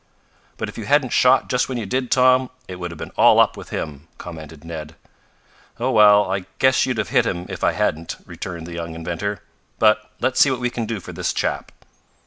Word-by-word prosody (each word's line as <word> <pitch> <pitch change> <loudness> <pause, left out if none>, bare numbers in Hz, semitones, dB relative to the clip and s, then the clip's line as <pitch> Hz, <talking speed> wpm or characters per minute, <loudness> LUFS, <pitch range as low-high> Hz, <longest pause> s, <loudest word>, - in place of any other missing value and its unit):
"But - - -3
if - - -8
you 110 - -5
hadn't 140 +1 +2
shot 130 +1 +4
just 125 +1 0
when 130 - -3
you 115 - -3
did, 125 +5 -2
Tom, 130 0 +4 0.2
it 90 - -7
would 90 -1 -5
have 85 - -9
been - - -7
all - - +6
up - - +4
with - - -10
him," 75 0 -5
commented 80 -3 -10
Ned. 80 -2 -7 0.8
"Oh, 125 +3 0
well, 105 -3 +6
I 95 -1 -2
guess 130 0 +3
you'd 125 -3 -1
have 110 - -2
hit 120 -2 +2
him 90 -3 -3
if - - -6
I - - +3
hadn't," 80 +2 -2
returned 85 -3 -7
the 85 - -8
young 85 -1 -5
inventor. 90 +5 -4 0.3
"But 110 0 +3
let's 130 - 0
see 140 - +6
what 130 -2 -1
we 125 -1 -1
can 115 -2 -3
do 110 -2 -3
for - - -9
this - - -2
chap." - - -2
105 Hz, 220 wpm, -21 LUFS, 85-125 Hz, 0.8 s, all